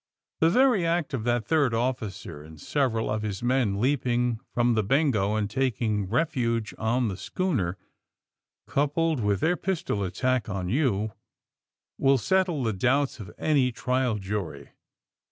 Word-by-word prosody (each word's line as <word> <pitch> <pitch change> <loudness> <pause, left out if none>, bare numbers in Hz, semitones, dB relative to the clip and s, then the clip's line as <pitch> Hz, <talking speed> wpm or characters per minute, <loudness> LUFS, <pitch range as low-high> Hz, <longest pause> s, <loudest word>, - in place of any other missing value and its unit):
'^The 160 - +5
very 245 -1 +4
act 165 -3 0
of 120 -4 -2
that 120 -2 +1
third 145 -7 +2
officer 110 - -3
and 80 0 -13
several 125 - 0
of 105 0 -1
his 105 0 -4
men 120 -5 +1
leaping 125 -2 +1
from 120 0 +2
the 110 -1 +1
^Bengo' 110 -4 +2
and 105 -1 0
taking 110 -5 -1
refuge 120 -5 0
on 120 +2 +1
the 100 - -3
schooner, 100 - -2 0.9
coupled 150 +2 0
with 105 -3 0
their 175 +2 +2
pistol 170 - -2
attack 125 +6 -1
on 95 -3 -3
you, 110 -4 +1 0.9
will 135 0 +4
settle 180 -1 +1
the 110 -2 0
doubts 130 +7 +1
of 105 - -8
any 140 -5 +2
trial 125 0 0
jury. 100 -2 -5
120 Hz, 145 wpm, -26 LUFS, 105-140 Hz, 0.9 s, ^The